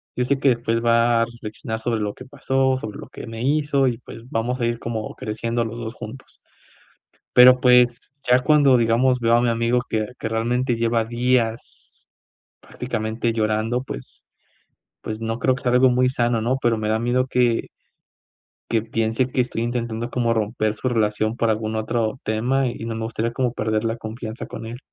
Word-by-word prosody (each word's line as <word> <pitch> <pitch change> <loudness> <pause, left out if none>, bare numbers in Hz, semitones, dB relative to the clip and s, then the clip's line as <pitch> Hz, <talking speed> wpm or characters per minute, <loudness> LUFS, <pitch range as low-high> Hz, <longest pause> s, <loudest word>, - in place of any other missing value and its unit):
yo 125 - 0
sé 140 +2 +1
que 135 - +3
después 115 -1 0
va 115 0 +4
a - - 0
reflexionar 110 -1 -7
sobre 115 0 -1
lo 105 -1 -2
que 130 - -12
pasó, 135 -1 0
sobre 110 -5 -7
lo - - -10
que - - -9
me 115 0 -7
hizo, 140 0 +2
y 120 - -1
pues 115 - -11
vamos 120 +2 -2
a - - +2
ir 120 0 -1
como 115 -2 -5
creciendo 115 +2 -2
los 115 +1 -6
2 115 0 -6
juntos. 120 +4 -10 0.9
Pero, 125 +1 +8
pues, 125 0 +4 0.2
ya 125 +1 +5
cuando, 140 -1 +5
digamos, 125 +2 +2
veo 115 0 +4
a 120 - +2
mi 120 - +2
amigo 115 +1 +1
que 110 -1 -1
que 110 - -3
realmente 120 +3 0
lleva 115 0 +1
días 120 -1 -2 0.5
prácticamente 115 -1 -3
llorando, 110 +2 0
pues - - -9 0.8
pues, 110 0 -5
no 115 0 -2
creo 130 +1 +2
que - - -9
sea 125 - +1
algo 125 +1 +5
muy 125 +1 +3
sano, 120 -3 0
¿no?, 125 +4 0
pero 115 -1 +2
me 110 -1 -2
da 110 - +2
miedo 125 +2 +1
que 125 -3 +1 1.0
que 115 -2 +1
piense 115 +2 0
que 130 - -1
estoy 115 -2 -4
intentando 120 0 -3
como 120 -2 +1
romper 110 0 -1
su 130 - -2
relación 110 -1 0
por 115 -2 +1
algún 110 0 -1
otro 110 +2 -1
tema, 125 +5 +1
y 120 -2 -4
no 115 -1 -4
me 110 - -3
gustaría 115 +1 -2
como 125 -1 -1
perder 110 -1 -1
la 115 0 -1
confianza 115 +1 -7
con 115 0 -8
él. 115 +2 -7
115 Hz, 195 wpm, -22 LUFS, 110-125 Hz, 1.0 s, Pero